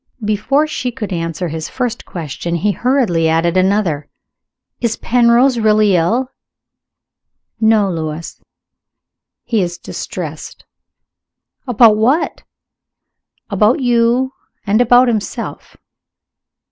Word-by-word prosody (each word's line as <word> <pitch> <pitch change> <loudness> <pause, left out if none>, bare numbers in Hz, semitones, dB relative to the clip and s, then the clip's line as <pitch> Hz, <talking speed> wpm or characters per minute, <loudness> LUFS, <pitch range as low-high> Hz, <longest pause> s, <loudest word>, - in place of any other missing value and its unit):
Before 215 +8 +1
she 255 -5 -3
could 215 -5 -5
answer 165 +1 -3
his 160 +1 -5
first 245 -3 -4
question, 170 +1 -5
he 205 +5 +1
hurriedly 210 -10 +1
added 165 +2 +1
another. 185 -6 +1 0.7
"Is 230 -2 -1
Penrose 240 +1 +3
really 215 -2 +3
ill?" 235 +10 0 1.3
"No, 220 -2 +3
Lewis. 160 -1 -5 1.0
He 225 -4 0
is 175 -1 -3
distressed." - - -7 1.0
"About 230 -3 +5
what?" 260 +10 +1 1.1
"About 210 +6 +3
you, 245 +1 +1 0.3
and 215 +3 +2
about 245 +1 +5
himself." 220 -4 -4
215 Hz, 95 wpm, -16 LUFS, 175-245 Hz, 1.3 s, About